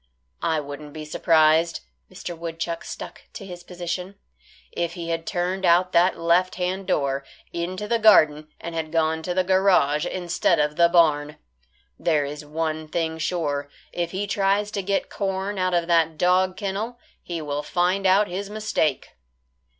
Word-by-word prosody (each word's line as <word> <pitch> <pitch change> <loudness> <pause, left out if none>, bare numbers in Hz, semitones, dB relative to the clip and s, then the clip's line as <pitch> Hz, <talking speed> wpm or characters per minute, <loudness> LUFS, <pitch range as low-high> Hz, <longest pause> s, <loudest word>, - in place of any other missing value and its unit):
"I 160 -1 +1
wouldn't 145 0 -8
be 155 -1 -7
surprised," 160 +1 +3 0.3
Mr. 175 - -6
Woodchuck 165 0 -4
stuck - - -8
to 200 - -8
his 180 -2 -9
position, 180 +2 -5 0.6
"if 170 0 -2
he 170 -2 -6
had 165 0 -3
turned 185 +2 -1
out 180 +1 +4
that 175 +2 +3
left 175 +2 +2
hand 185 +1 -2
door, 140 -1 0 0.3
into 185 +4 -3
the 235 +1 +1
garden 155 -9 +5
and 170 - -6
had 160 -1 -3
gone 160 -1 +1
to 175 +2 -3
the 185 - +3
garage 180 -5 +3
instead 175 -1 +1
of 150 0 +1
the 170 +1 +5
barn. 150 -4 +3 0.6
There 155 -4 +2
is 145 +1 -6
one 155 +1 -3
thing 160 0 -2
sure; 145 -5 -2 0.2
if 175 -1 -2
he 195 +3 -3
tries 200 +1 +1
to 200 - -2
get 195 +1 -1
corn 195 0 -2
out 185 -1 +1
of 170 -1 +1
that 165 -2 +2
dog 185 +2 +2
kennel, 205 +5 -3 0.2
he 170 -1 -5
will 145 -1 -3
find 180 +5 +1
out 200 +3 +4
his 195 +3 -5
mistake." 210 -9 -1
170 Hz, 165 wpm, -24 LUFS, 160-185 Hz, 0.6 s, garden